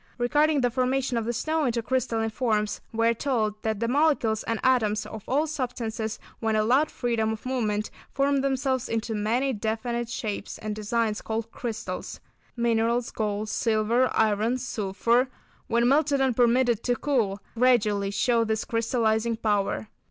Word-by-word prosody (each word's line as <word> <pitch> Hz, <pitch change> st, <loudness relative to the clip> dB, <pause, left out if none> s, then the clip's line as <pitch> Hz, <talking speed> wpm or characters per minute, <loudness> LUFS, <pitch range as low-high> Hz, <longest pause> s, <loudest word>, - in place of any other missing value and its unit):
Regarding 295 Hz, +4 st, +2 dB
the 245 Hz, -1 st, +2 dB
formation 255 Hz, +1 st, 0 dB
of 230 Hz, -1 st, -1 dB
the 235 Hz, -, 0 dB
snow 310 Hz, +6 st, 0 dB
into 235 Hz, -2 st, 0 dB
crystalline 225 Hz, -2 st, 0 dB
forms, 215 Hz, -3 st, 0 dB
we 230 Hz, 0 st, 0 dB
are 230 Hz, -, +4 dB
told 220 Hz, -4 st, -1 dB
that 220 Hz, -2 st, -1 dB
the 230 Hz, -, 0 dB
molecules 255 Hz, -5 st, +2 dB
and 230 Hz, -1 st, -1 dB
atoms 220 Hz, -5 st, +2 dB
of 220 Hz, -2 st, -8 dB
all 290 Hz, +4 st, +2 dB
substances 235 Hz, -7 st, -3 dB, 0.2 s
when 220 Hz, -1 st, 0 dB
allowed 245 Hz, +8 st, +3 dB
freedom 225 Hz, -3 st, -1 dB
of 220 Hz, -, -9 dB
movement, 215 Hz, -5 st, -1 dB, 0.2 s
form 280 Hz, 0 st, +2 dB
themselves 265 Hz, -2 st, 0 dB
into 225 Hz, 0 st, -2 dB
many 235 Hz, +6 st, 0 dB
definite 230 Hz, +2 st, -2 dB
shapes 210 Hz, -4 st, -4 dB
and 215 Hz, -1 st, -4 dB
designs 215 Hz, 0 st, -1 dB
called 225 Hz, 0 st, -4 dB
crystals. 220 Hz, -6 st, -5 dB, 0.4 s
Minerals, 235 Hz, 0 st, +1 dB
gold, 210 Hz, -1 st, -2 dB
silver, 225 Hz, +3 st, +2 dB
iron, 220 Hz, +3 st, +2 dB
sulphur, 235 Hz, +1 st, 0 dB, 0.4 s
when 235 Hz, +1 st, +2 dB
melted 280 Hz, +1 st, +3 dB
and 265 Hz, -3 st, +2 dB
permitted 240 Hz, -1 st, +3 dB
to 245 Hz, -, +2 dB
cool, 230 Hz, -8 st, 0 dB
gradually 220 Hz, -5 st, +2 dB
show 230 Hz, +3 st, +2 dB
this 220 Hz, -1 st, -1 dB
crystallising 230 Hz, -1 st, +1 dB
power. 205 Hz, -, 0 dB
230 Hz, 150 wpm, -26 LUFS, 220-255 Hz, 0.4 s, are